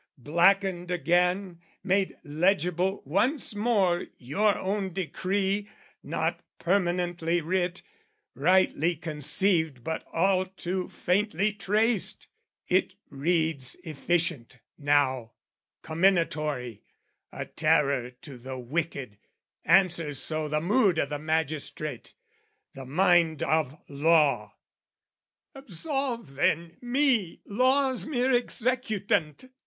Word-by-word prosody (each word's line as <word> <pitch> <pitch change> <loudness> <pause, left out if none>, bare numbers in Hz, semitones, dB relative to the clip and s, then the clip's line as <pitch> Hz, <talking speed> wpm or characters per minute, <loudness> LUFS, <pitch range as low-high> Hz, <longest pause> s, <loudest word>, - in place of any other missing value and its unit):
Blackened 175 +5 +2
again, 180 +1 +1 0.2
made 190 0 0
legible 180 +4 0
once 220 - 0
more 205 -5 +1
Your 200 - +1
own 195 -1 -2
decree, 195 +3 -1 0.3
not - - -2 0.2
permanently 175 -2 0
writ, 180 +2 -2 0.5
Rightly 175 +1 +2
conceived 155 -2 0
but 160 +4 -3
all 185 +2 +2
too 185 0 -4
faintly 200 +2 0
traced, 210 +1 +1 0.4
It - - +1 0.2
reads 155 -2 0
efficient, 160 -5 -1 0.2
now, 135 -5 +1 0.5
comminatory, 155 - 0 0.5
A - - -5
terror 145 -5 +1
to 135 -5 -10
the 130 +2 -7
wicked, 130 -4 -4 0.5
answers 170 -4 +3
so 155 +2 -2
The 150 +1 0
mood 195 0 +3
o' 160 - +2
the 145 +1 -5
magistrate, 155 -1 -3 0.6
the 135 -3 -9
mind 170 0 +3
of 155 -1 0
law. 140 -7 +2 1.0
Absolve, 270 - -4
then, 165 +4 0
me, 245 - +1
law's 260 +4 +1
mere 260 -3 +1
executant! 225 - 0
175 Hz, 95 wpm, -27 LUFS, 150-195 Hz, 1.0 s, answers